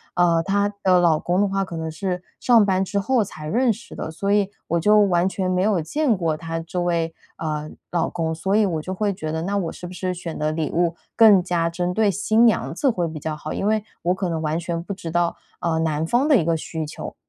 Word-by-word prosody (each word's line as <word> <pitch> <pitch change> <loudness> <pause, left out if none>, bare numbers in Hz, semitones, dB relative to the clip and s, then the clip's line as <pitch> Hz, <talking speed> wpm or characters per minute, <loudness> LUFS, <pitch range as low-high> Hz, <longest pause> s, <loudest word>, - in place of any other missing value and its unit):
呃， 170 -2 +3
她 200 +1 +1
的 185 -2 +5
老 165 -3 +3
公 180 +2 +1
的 205 - +3
话 195 0 -1
可 180 -3 -8
能 160 0 -3
是， 180 +2 -3 0.2
上 235 -4 +5
班 190 -1 +2
之 200 - -3
后 235 +2 +2
才 155 -6 -9
认 240 +8 +2
识 235 - -13
的， - - -5
所 200 +5 -2
以 205 -1 +3 0.2
我 170 +1 +1
就 210 +5 +5
完 180 -3 +3
全 190 -1 -2
没 185 0 +1
有 195 -4 +2
见 265 - +1
过 165 -3 0
她 165 0 -4
这 175 +2 -4
位， 170 -2 0 0.2
呃， 155 -1 -3 0.2
老 170 -2 0
公。 165 -2 -2
所 190 +4 -2
以 215 - +4
我 165 -5 -1
就 185 +4 -5
会 205 +1 0
觉 155 -4 -5
得， 160 - -2
那 200 +2 -1
我 175 -5 -2
是 180 - -9
不 180 - -9
是 185 0 -2
选 170 -2 -6
的 155 0 0
礼 155 -1 -2
物 170 0 +1 0.2
更 210 -4 +7
加 170 -2 0
针 175 +1 -2
对 215 -1 +3
新 215 +4 +3
娘 230 - +2
子 275 - +1
会 180 -8 0
比 160 -1 -6
较 155 +1 -3
好？ 150 - -6
因 - - -2
为 215 -1 +1 0.2
我 175 +2 +2
可 185 -1 -2
能 160 -1 -2
完 155 +1 -1
全 170 -1 -3
不 200 - -5
知 175 -3 -7
道， 175 0 0 0.2
呃， 160 -1 0
男 160 -1 0
方 245 - +2
的 290 -5 +6
一 170 - +1
个 165 0 +2
需 160 0 -4
求。 150 - -7
180 Hz, 275 characters per minute, -22 LUFS, 165-200 Hz, 0.2 s, 更